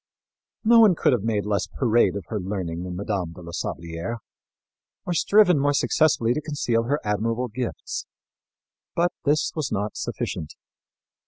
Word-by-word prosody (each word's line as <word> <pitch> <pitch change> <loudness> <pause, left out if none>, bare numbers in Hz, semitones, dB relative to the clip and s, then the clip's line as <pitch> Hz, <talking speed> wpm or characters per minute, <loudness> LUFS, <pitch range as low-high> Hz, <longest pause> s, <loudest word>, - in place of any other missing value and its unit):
No 230 +1 +6
one 210 -6 +7
could 145 - +3
have 120 - +1
made 105 -1 -1
less 100 -2 0
parade 120 -4 +2
of 100 -4 -5
her 110 - -2
learning 90 -3 -3
than 90 0 -5
Mme. 95 -3 -3
de - - -10
la 85 - -8
Sablière, 85 +5 -4 0.9
or 175 - -1
striven 180 -1 +4
more 145 +1 +2
successfully 135 -5 +2
to 150 - -2
conceal 120 -6 -1
her 145 +4 0
admirable 115 +4 -1
gifts. 120 +3 -4 0.9
But 175 +1 +2
this 150 +2 +2
was 155 -5 -2
not 105 +2 -2
sufficient. 75 - -4
115 Hz, 155 wpm, -24 LUFS, 100-145 Hz, 0.9 s, one